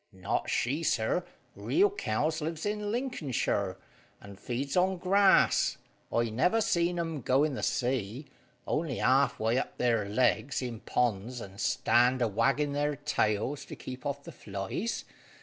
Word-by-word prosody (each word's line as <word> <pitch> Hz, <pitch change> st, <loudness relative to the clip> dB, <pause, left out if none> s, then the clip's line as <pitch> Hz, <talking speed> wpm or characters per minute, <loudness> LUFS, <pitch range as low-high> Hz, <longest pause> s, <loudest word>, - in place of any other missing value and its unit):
"Not 95 Hz, -3 st, -2 dB
she, 140 Hz, +7 st, 0 dB
sir. 110 Hz, -8 st, +1 dB, 0.3 s
Real 130 Hz, -, +2 dB
cows 155 Hz, -, -1 dB
lives 160 Hz, +2 st, -3 dB
in 205 Hz, 0 st, -2 dB
Lincolnshire, 145 Hz, -, -1 dB, 0.4 s
and 100 Hz, -1 st, -12 dB
feeds 135 Hz, +3 st, -3 dB
on 185 Hz, +1 st, +2 dB
grass. 190 Hz, +2 st, +4 dB, 0.3 s
I 115 Hz, -1 st, +1 dB
never 180 Hz, -, +2 dB
see 170 Hz, -5 st, +2 dB
'em 165 Hz, -4 st, -3 dB
go 130 Hz, +4 st, +3 dB
in 150 Hz, -2 st, 0 dB
the -, -, -4 dB
sea, 125 Hz, +1 st, -1 dB, 0.4 s
only 155 Hz, -5 st, -1 dB
halfway 130 Hz, -3 st, +2 dB
up -, -, -5 dB
their 115 Hz, -5 st, +1 dB
legs 120 Hz, +3 st, +1 dB
in 120 Hz, -3 st, -4 dB
ponds, 120 Hz, +1 st, -1 dB
and 100 Hz, -2 st, -8 dB
stand 125 Hz, +2 st, +3 dB
a 120 Hz, -, +2 dB
waggin' 140 Hz, +7 st, +1 dB
their 145 Hz, +1 st, 0 dB
tails 140 Hz, -2 st, -1 dB
to -, -, -8 dB
keep 130 Hz, 0 st, -8 dB
off 140 Hz, 0 st, -3 dB
the -, -, -9 dB
flies. 100 Hz, -, -4 dB
130 Hz, 150 wpm, -30 LUFS, 115-160 Hz, 0.4 s, grass